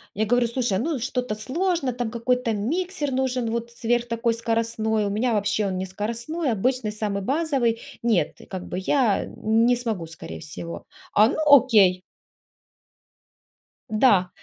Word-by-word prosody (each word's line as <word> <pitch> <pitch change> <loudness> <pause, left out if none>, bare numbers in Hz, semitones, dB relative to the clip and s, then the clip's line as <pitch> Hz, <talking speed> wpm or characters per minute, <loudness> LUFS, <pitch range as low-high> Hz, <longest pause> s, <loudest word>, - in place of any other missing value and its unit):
я 215 +2 +1
говорю: 245 +2 +2
"Слушай, 235 -5 0
ну 300 +3 -1
что-то 250 -3 -2
сложно, 275 - -1
там 240 -2 -3
какой-то 240 0 0
миксер 295 - -2
нужен, 255 -3 -1
вот 235 0 -3
сверх 240 0 -1
такой 230 0 0
скоростной, 225 -2 0
у - - -1
меня 225 +4 0
вообще 205 0 +1
он 185 - -2
не 185 - -2
скоростной, 235 - -2
обычный 235 +1 0
самый 210 -2 -2
базовый, 265 -2 0 0.2
нет, 205 -10 +1
как 185 -2 -6
бы - - -4
я 225 0 +1
не 225 +3 +2
смогу 225 -8 -2
скорее 160 - -9
всего". 170 +2 -8 0.3
А, 210 +1 +6
ну, - - -2
окей. 220 -10 +6 1.9
Да. 210 -5 +4
230 Hz, 145 wpm, -24 LUFS, 210-255 Hz, 1.9 s, А